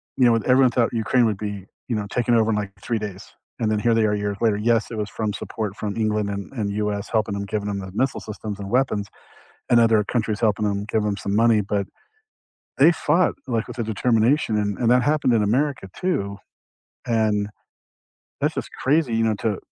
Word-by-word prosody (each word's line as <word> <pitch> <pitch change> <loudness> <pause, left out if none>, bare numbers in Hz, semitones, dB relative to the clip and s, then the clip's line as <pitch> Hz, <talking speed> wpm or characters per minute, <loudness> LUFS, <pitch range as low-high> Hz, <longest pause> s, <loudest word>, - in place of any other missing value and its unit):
know, 120 -3 +4
everyone 125 +2 +4
thought 120 0 +1
Ukraine 120 +2 +2
would 110 -3 +1
be, 105 -2 -5 0.2
you 115 - 0
know, 105 -1 -3
taken 120 +2 0
over 115 -1 +3
in - - +1
like 105 -2 -3
3 115 - -1
days, 100 -3 -6 0.3
and 110 -2 +1
then 110 - +1
here 115 +2 +2
they 115 -1 +3
are 105 - +1
years 105 -1 -2
later. 110 -3 +2
Yes, 115 +2 +1
it 115 - -6
was 105 -1 -3
from 105 -2 -3
support 105 -1 -4
from 105 -1 -4
England 105 -2 0
and 100 +3 -5
and 105 -5 -2
US 105 -1 -2
helping 110 -2 0
'em, 100 - -3
giving 105 +1 -3
'em 100 -1 -2
the 95 -1 -7
missile 130 +5 0
systems 105 -1 -6
and 100 -1 -7
weapons, 120 -5 +1 0.6
and 120 - +6
other 115 -2 +4
countries 110 -1 -2
helping 105 -2 +1
'em 100 0 -1
give 110 0 0
'em 100 -1 -1
some 100 +1 -2
money, 115 -1 +4
but 100 0 -1 0.9
they 150 +5 +7
fought, 165 +2 +1
like, 115 -3 -1
with - - -8
a 115 - +1
determination 115 +3 +2
and 105 -1 -1
and 120 -1 +3
that 125 - +5
happened 145 -3 +2
in 110 - +3
America 130 +1 0
too, 135 - -1 0.7
and, 110 -3 +1 0.9
that's - - 0
just - - -4
crazy, 140 -3 +2
you 115 0 +2
know, 110 -1 +2
to 105 -1 -2
110 Hz, 215 wpm, -23 LUFS, 105-120 Hz, 0.9 s, they